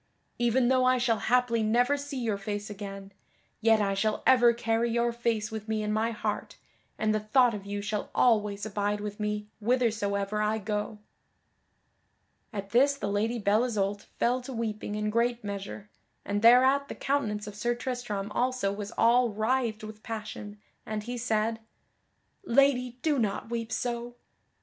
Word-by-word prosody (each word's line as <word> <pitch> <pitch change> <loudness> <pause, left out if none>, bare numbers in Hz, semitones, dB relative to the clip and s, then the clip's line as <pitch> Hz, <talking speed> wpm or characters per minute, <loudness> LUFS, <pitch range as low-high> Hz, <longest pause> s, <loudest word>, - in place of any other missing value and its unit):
Even 240 +1 +3
though 260 -1 +3
I 255 0 +4
shall 235 -3 +1
haply 245 -1 +2
never 245 +6 +3
see 285 -1 -6
your 225 -5 -1
face 205 +1 -4
again, 195 -1 -8 0.5
yet 225 -1 +4
I 200 -1 +1
shall 215 +2 0
ever 245 -2 +6
carry 230 0 0
your 235 0 +1
face 230 -2 -1
with 220 0 -6
me 220 -1 -1
in 210 0 -1
my 220 +2 +1
heart, 230 - -4 0.4
and 215 0 +1
the 215 - +1
thought 240 +3 +3
of 200 -1 -7
you 205 0 -4
shall 210 0 -3
always 210 -4 +2
abide 205 0 -1
with 205 0 -6
me 210 0 -2
withersoever 210 -3 0
I 215 +1 +1
go." 210 0 -3 1.5
At 200 -3 -6
this 275 +4 +4
the 205 -7 -3
Lady 220 +4 0
Belle 210 +1 +2
Isoult 205 -4 -2
fell 250 +2 +1
to 250 - -8
weeping 215 -3 -3
in 210 0 -1
great 235 +1 +1
measure, 200 0 -6 0.3
and 205 0 -1
thereat 260 +4 +6
the - - -7
countenance 220 -7 -1
of 210 - -7
Sir 240 +4 -1
Tristram 240 -5 -4
also 250 -3 0
was 205 +1 -6
all 240 +1 +4
writhed 220 +1 -1
with 215 0 -9
passion, 215 -2 -7 0.2
and 215 -1 -4
he 245 +3 -5
said, 225 -1 0 0.8
"Lady, 250 -4 +2
do 300 -4 +2
not 215 +1 -2
weep 230 -1 -3
so!" 240 +1 -3
220 Hz, 165 wpm, -28 LUFS, 210-240 Hz, 1.5 s, ever